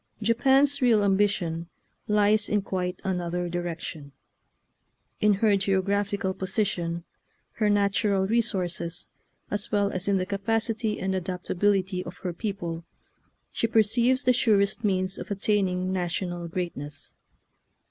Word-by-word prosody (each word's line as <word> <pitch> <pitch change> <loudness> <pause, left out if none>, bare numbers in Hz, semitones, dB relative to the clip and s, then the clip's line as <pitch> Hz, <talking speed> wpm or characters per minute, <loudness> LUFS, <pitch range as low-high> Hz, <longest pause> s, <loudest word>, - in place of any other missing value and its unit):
Japan's 265 +6 +3
real 230 -5 +4
ambition 190 -4 +1 0.4
lies 210 0 +3
in 205 -1 +1
quite 180 -2 -3
an 185 -2 -1
other 175 +1 -2
direction. 170 -4 -5 1.1
In 210 -1 +4
her 205 0 +3
geographical 195 +1 0
po 190 - -5
sition, 170 -5 -1 0.5
her 215 -2 +2
natural 200 -1 +2
resources, 185 -6 -1 0.4
as 205 -1 -1
well 205 -1 +2
as 185 +1 -3
in 200 -1 +3
the 185 - -1
capacity 220 +2 -1
and 190 0 -1
adaptability 185 +1 0
of 175 - -9
her 180 - -1
people, 170 -4 -4 0.7
she 230 - 0
perceives 235 +4 +3
the 250 - +4
surest 210 -2 +2
means 185 -2 0
of - - -7
attaining 190 -2 0
national 175 -1 -2
greatness." 150 -5 -5
195 Hz, 125 wpm, -26 LUFS, 180-210 Hz, 1.1 s, real